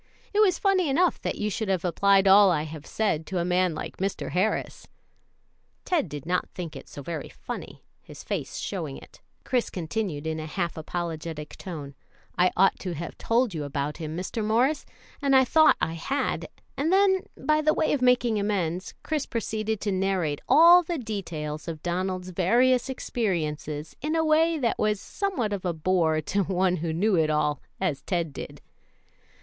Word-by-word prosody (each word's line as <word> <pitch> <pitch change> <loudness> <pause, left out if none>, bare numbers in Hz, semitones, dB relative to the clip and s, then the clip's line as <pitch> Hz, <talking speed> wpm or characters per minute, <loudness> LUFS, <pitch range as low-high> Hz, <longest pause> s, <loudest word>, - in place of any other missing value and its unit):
It 415 - +2
was 385 -5 +5
funny 380 -5 +2
enough 345 +6 +2
that - - -2
you 210 0 -1
should 220 +2 -2
have 185 -2 0
applied 195 +3 +4
all 195 +1 +8
I 155 -4 +1
have 155 -1 -8
said 180 -8 -1
to 190 - -3
a 170 - 0
man 180 -1 +2
like - - -6
Mr. 195 +1 -3
Harris." 190 +4 -1 1.0
Ted 330 - +1
did 145 0 -7
not 180 +2 0
think 170 -4 -6
it - - -10
so 145 - -9
very 160 -1 -5
funny, - - -8 0.2
and - - -37
his - - -10
face - - -4
showing 70 - -4
it, - - -15 0.2
Chris 250 -2 0
continued 170 -3 -3
in 160 0 -2
a 155 - -5
half 170 +1 -2
apologetic 160 -2 -5
tone, 150 -6 -7 0.4
"I 180 +1 +4
ought 195 +2 +4
to 180 -3 -4
have 165 +3 -6
told 235 -2 +1
you 155 -3 -3
about 145 +1 -3
him, 160 -1 -5
Mr. 190 +5 -3
Morris, 245 +8 +1 0.3
and 275 -1 +3
I 260 0 +6
thought 315 +4 +5
I 160 - -1
had 270 - -2 0.3
and 310 +4 0
then, 385 0 +3
by 305 0 +2
the 310 0 +3
way - - +1
of 285 - 0
making 245 -3 +3
amends, 185 -3 -2
Chris 305 -2 -2
proceeded 220 -2 -2
to 205 - -1
narrate 185 -6 0
all 340 +3 +8
the 345 0 -3
details 170 - -5
of 160 -2 -6
Donald's 185 +1 -2
various 240 +9 +3
experiences 155 - -3
in 310 +3 -1
a 320 0 +2
way 320 +1 +3
that 240 -6 0
was 210 -1 +1
somewhat 345 - -2
of 195 - -4
a 180 -2 0
bore 160 -1 +1
to 200 +6 0
one 185 0 +1
who 165 0 -2
knew 200 +7 +1
it 155 -1 +2
all 150 -2 +1 0.2
as 180 -8 -1
Ted 170 -5 -2
did. - - -8
190 Hz, 185 wpm, -26 LUFS, 160-250 Hz, 1.0 s, all